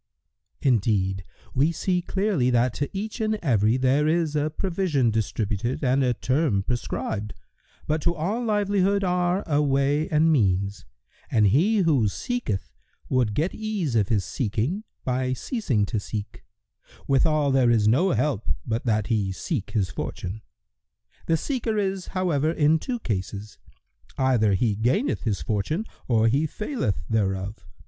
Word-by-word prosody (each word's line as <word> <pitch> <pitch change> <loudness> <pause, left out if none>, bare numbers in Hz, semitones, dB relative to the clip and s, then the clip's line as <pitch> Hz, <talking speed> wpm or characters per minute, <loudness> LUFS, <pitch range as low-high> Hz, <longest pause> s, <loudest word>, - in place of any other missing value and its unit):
"— - - -51
"Indeed, 100 -7 +1 0.3
we 145 +5 +3
see 180 +1 0
clearly 190 -8 0
that 120 0 +2
to 145 - -2
each 215 +4 -4
and 215 0 +1
every 115 - +2
there 135 +3 +2
is 160 -1 +1
a 150 +1 +1
provision 165 - 0
distributed 110 +2 -2
and 135 +1 +3
a 125 -2 +1
term 130 -6 +1
prescribed; 110 -2 -3 0.5
but 155 +1 0
to 170 +3 +1
all 195 +10 -2
livelihood 200 -2 +1
are 180 +1 +1
a 150 -2 +2
way 140 +2 +1
and 160 +1 +3
means, 100 - +1 0.4
and 110 -2 +3
he 180 - +3
who 145 - +3
seeketh 105 - -3 0.4
would 120 -5 +1
get 160 - 0
ease 210 - -2
of 105 -4 +3
his 105 -5 +1
seeking 130 - -2 0.2
by 130 0 0
ceasing 130 - -1
to 110 +1 -2
seek; 105 +1 -6 0.6
withal 145 +1 +2
there 130 -2 +4
is 110 -3 +3
no 145 - +4
help 145 - 0 0.2
but 115 +2 -2
that 105 -2 +2
he 105 -5 0
seek 105 - -3
his 100 -4 -1
fortune. 95 +6 -5 0.9
The 165 - +3
seeker 230 - -2
is, 195 -2 -1
however, 160 -5 +1
in 160 -1 +3
two 250 +8 -3
cases: 105 - -4 0.6
either 120 -6 +3
he 110 +3 +1
gaineth 125 - 0
his 105 -4 -1
fortune 115 - -1 0.2
or 115 -2 +3
he 140 +7 +2
faileth 210 - -3
thereof. 100 -1 -1
135 Hz, 150 wpm, -25 LUFS, 110-175 Hz, 0.9 s, there